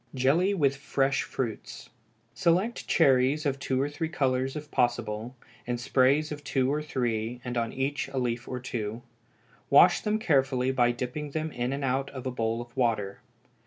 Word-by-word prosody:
Jelly 160 +10 +2
with 140 -5 +2
Fresh 140 0 0
Fruits. 120 -5 -5 0.4
Select 185 +8 +1
cherries 135 0 +3
of 140 -1 0
two 130 -1 -1
or 140 - +1
three 145 +2 -4
colors 135 -4 0
if 150 -1 -7
possible, 120 0 -1 0.3
in 120 0 -1
sprays 135 +5 +2
of 145 -1 -6
two 135 -1 +1
or 150 - -1
three, 120 -5 -2
and 125 0 -4
on 115 -1 -1
each 135 +2 -2
a 135 - -6
leaf 120 -1 -2
or 125 - -4
two; 115 -2 -4 0.7
wash - - +6
them 210 0 0
carefully 135 - +2
by 120 -2 +3
dipping 125 +5 -4
them 155 +2 -3
in 120 0 -2
and 140 +1 -3
out 135 +1 0
of 130 -2 -8
a 130 - -1
bowl 115 -1 -1
of 120 0 -22
water. 110 -6 0
130 Hz, 175 wpm, -28 LUFS, 120-145 Hz, 0.7 s, wash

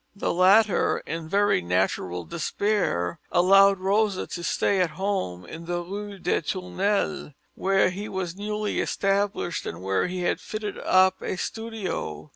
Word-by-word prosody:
The 200 - -1
latter, 195 +4 +4
in 165 -1 -5
very 205 - +3
natural 90 0 -1
despair, 170 - -1
allowed 195 +2 +6
Rosa 195 +1 +1
to 175 - -6
stay 190 +2 +1
at 180 - +2
home, 190 - -2
in 165 - -9
the 175 0 -2
Rue 200 +2 -6
des 180 - 0
Tournelles, 185 0 -1 0.2
where 195 -1 +2
he 205 +4 -6
was 180 -3 -4
newly 210 +1 -2
established 195 -3 -1
and 85 +2 -6
where 95 - +1
he 180 0 -4
had 175 - 0
fitted 215 -1 -5
up 185 0 +3
a - - -3
studio. 195 - -4
185 Hz, 145 wpm, -25 LUFS, 170-205 Hz, 0.2 s, allowed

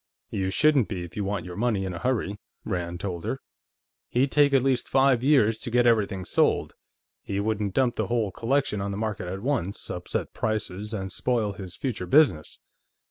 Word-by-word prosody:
"You 95 -1 -1
shouldn't 145 +2 +4
be, 90 -4 -4
if 85 - -10
you 105 - -2
want 100 -2 -2
your 90 -1 -7
money 105 -3 0
in 95 - -3
a 85 - -5
hurry," 105 -5 -1 0.3
Rand 90 -3 -3
told 90 -4 -4
her. - - -2 0.7
"He'd 130 +3 +1
take 145 -1 +5
at 135 -2 +4
least 135 -2 +1
five 135 -2 +3
years 115 -6 +4
to - - -4
get 120 +1 +3
everything 105 -5 +2
sold. - - +1 0.5
He 100 - -3
wouldn't 105 -2 -1
dump 130 -2 +2
the - - 0
whole 115 -4 0
collection 115 -1 0
on 100 - -2
the 100 - -3
market 105 -4 -3
at 95 +3 -5
once, 120 -8 -2
upset 90 - -4
prices, 105 -2 -2
and 95 -4 -4
spoil 115 -5 0
his 95 -3 -8
future 115 -9 -3
business. 95 - +3
105 Hz, 190 wpm, -26 LUFS, 95-125 Hz, 0.7 s, take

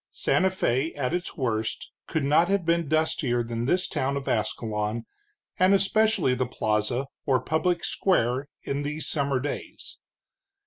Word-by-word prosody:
Santa 190 - +2
Fé, 150 -5 -1
at 135 +1 -1
its 175 0 -3
worst, 110 -5 -2 0.2
could 160 -3 -1
not 150 +5 +4
have 195 -2 +1
been 170 -1 +1
dustier 150 -6 +1
than 115 0 -3
this 180 +7 +1
town 135 +1 -1
of 140 - -6
Ascalon, 110 0 -1 0.5
and 185 +2 +6
especially 200 - +3
the 125 0 -1
plaza, 110 +3 0 0.2
or 130 -2 +4
public 170 +4 0
square, 135 -7 +1 0.2
in 140 +1 -2
these 150 +2 -3
summer 140 -3 0
days. 145 +3 -6
140 Hz, 145 wpm, -26 LUFS, 120-170 Hz, 0.5 s, and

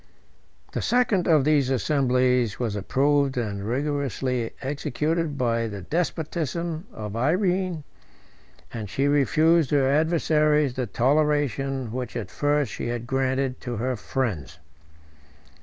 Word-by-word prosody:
The - - -3
second 235 -7 +2
of 155 -5 +4
these 145 -4 +3
assemblies 125 -4 +1
was 115 -4 -1
approved 140 +6 +1
and 105 -4 -2
rigorously 130 -1 -1
executed 150 +3 -2
by 115 -2 0
the 100 -3 -7
despotism 165 - -2
of 105 -1 -7
Irene, 180 - 0 0.9
and 110 -4 -5
she 135 +7 0
refused 155 +2 +3
her 140 -3 +3
adversaries 150 -1 +2
the 125 -1 -3
toleration 135 -1 +1
which 125 -1 -5
at 105 -5 -5
first 145 -1 0
she - - -4
had 120 0 -3
granted 130 0 -1
to 120 -1 -4
her 125 +4 -1
friends. 100 - -3
135 Hz, 120 wpm, -25 LUFS, 120-150 Hz, 0.9 s, of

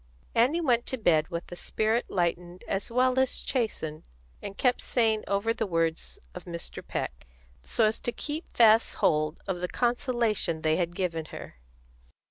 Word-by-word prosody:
Annie 260 +9 +3
went 245 -6 +2
to 260 - -1
bed 160 -8 +3
with 170 0 -6
a - - -5
spirit 220 +6 0
lightened 175 0 -2
as 195 +4 -1
well 255 +2 +3
as 260 -1 +2
chastened, 160 - -2 0.4
and 200 -1 -7
kept 250 -1 +2
saying 220 -3 +1
over 200 +3 +1
the 225 -2 -2
words 165 -2 -1 0.2
of - - -9
Mr. 170 -1 -5
Peck, - - -5 0.3
so 220 - +1
as 215 +1 +1
to 240 - -2
keep 300 +7 -4
fast 225 -1 +6
hold 155 0 +2
of 190 -2 -2
the 180 - 0
consolation 235 - 0
they 155 0 +3
had 175 -1 -1
given 165 -4 -2
her. 60 - -10
205 Hz, 165 wpm, -28 LUFS, 170-240 Hz, 0.4 s, fast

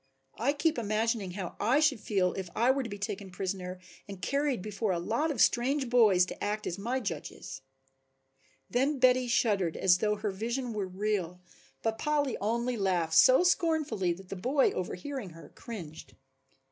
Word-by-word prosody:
I 265 +6 +2
keep 310 -1 0
imagining 215 -3 -1
how 185 -2 -5
I 240 +8 +3
should 300 -6 +3
feel 190 -4 0
if 190 -2 -5
I 240 +3 +4
were 275 +1 0
to 240 - -5
be 205 - -6
taken 200 0 -5
prisoner 185 0 -4 0.3
and 200 -2 -8
carried 275 - 0
before 210 0 -2
a 180 - 0
lot 230 - -1
of 280 -7 -3
strange 260 +1 +2
boys 210 -7 +5
to - - -7
act 210 +1 -2
as 175 - -4
my 240 +6 -1
judges." 170 - -6 1.1
Then 270 +4 +1
Betty 255 -1 +4
shuddered 200 -8 +1
as 180 -1 +4
though 210 +1 +1
her 210 0 -3
vision 235 +5 -3
were 205 -3 -2
real, 185 -2 -2 0.4
but 225 0 -1
Polly 290 -4 0
only 235 +3 -1
laughed 180 -5 0
so 260 - +7
scornfully 315 - +1
that 185 +1 -13
the - - -4
boy, 260 +9 +2
overhearing 205 +5 -5
her, 165 - -13
cringed. 175 -10 -9
215 Hz, 170 wpm, -30 LUFS, 190-255 Hz, 1.1 s, so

